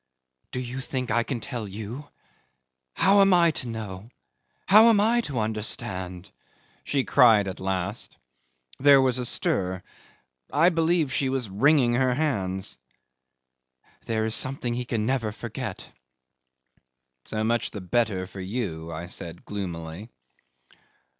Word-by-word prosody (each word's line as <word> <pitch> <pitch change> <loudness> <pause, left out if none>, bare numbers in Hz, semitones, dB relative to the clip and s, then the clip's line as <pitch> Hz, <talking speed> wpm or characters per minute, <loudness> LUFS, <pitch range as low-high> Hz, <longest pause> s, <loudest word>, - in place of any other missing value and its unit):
'"Do 125 - -3
you 125 +1 -5
think 130 -1 -3
I 120 - +3
can 120 +1 -3
tell 115 -1 -5
you? 110 +8 -7 0.9
How 200 +1 +5
am 195 -2 +5
I 170 -1 +5
to 130 - -5
know? 110 -2 -7 0.6
How 215 +3 +8
am 225 -3 +5
I 230 +3 +3
to 140 - -4
understand?" 105 -4 -3 0.5
she 140 -2 0
cried 115 -8 +5
at 95 - -5
last. 95 -2 -3 0.6
There 140 0 +7
was 130 -1 +2
a 125 - -1
stir. 95 -4 -1 0.7
I 160 +5 +5
believe 165 -4 +1
she 135 - 0
was 130 -6 -2
wringing 125 +3 +3
her 125 0 +2
hands. 95 - -2 1.3
"There 110 -1 0
is 110 - 0
something 130 -2 +1
he 125 +1 -3
can 115 -3 -2
never 120 -3 0
forget." 115 +1 -6 1.3
'"So 110 0 -3
much 115 +1 0
the 105 - -7
better 100 -1 0
for 95 +1 -11
you," 95 -6 -4
I 85 +2 -6
said 85 -1 -8
gloomily. 90 0 -6
115 Hz, 135 wpm, -25 LUFS, 95-135 Hz, 1.3 s, How